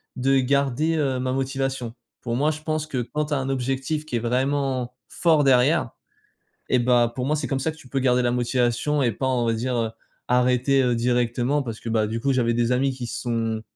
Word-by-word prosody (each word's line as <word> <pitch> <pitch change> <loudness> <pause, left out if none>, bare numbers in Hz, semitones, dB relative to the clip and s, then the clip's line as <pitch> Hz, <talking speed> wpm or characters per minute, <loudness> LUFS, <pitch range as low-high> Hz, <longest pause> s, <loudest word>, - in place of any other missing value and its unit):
de 135 +1 +2
garder, 140 +4 +1
heu, 135 -4 0
ma 130 0 -1
motivation. 135 -3 -2 0.3
Pour 120 -1 -3
moi, 150 +4 +2
je 155 - -7
pense 155 0 -2
que 130 -5 -2
quand 150 +5 -2
tu 150 - -4
as - - +2
un 135 0 -3
objectif 135 +4 -2
qui 125 - -4
est - - +1
vraiment 130 +1 -1
fort 160 -4 +3
derrière 135 +2 +3 0.8
et 125 - +4
bah, 120 -1 +3
pour 125 - -2
moi, 150 +3 +1
c'est 150 - -3
comme 135 -2 -1
ça 160 +4 -1
que 160 - -14
tu 130 - -15
peux 135 +1 -1
garder 125 -1 +3
la 120 0 +1
motivation 125 +3 0
et 120 - +2
pas, 130 - -2
on 125 -2 +1
va 115 - +1
dire, 125 +2 -2
heu, 115 -1 -1 0.4
arrêter, 125 +2 +3
heu, 125 -1 +2
directement. 120 +3 +1
Parce 115 -3 -6
que, - - -10
bah, 110 -1 +2
du 115 +2 -3
coup, 135 +2 +1
j'avais 120 -2 +1
des 120 +1 +1
amis 135 +2 +2
qui 125 -2 -6
sont 115 -2 -2
130 Hz, 225 wpm, -24 LUFS, 120-140 Hz, 0.8 s, et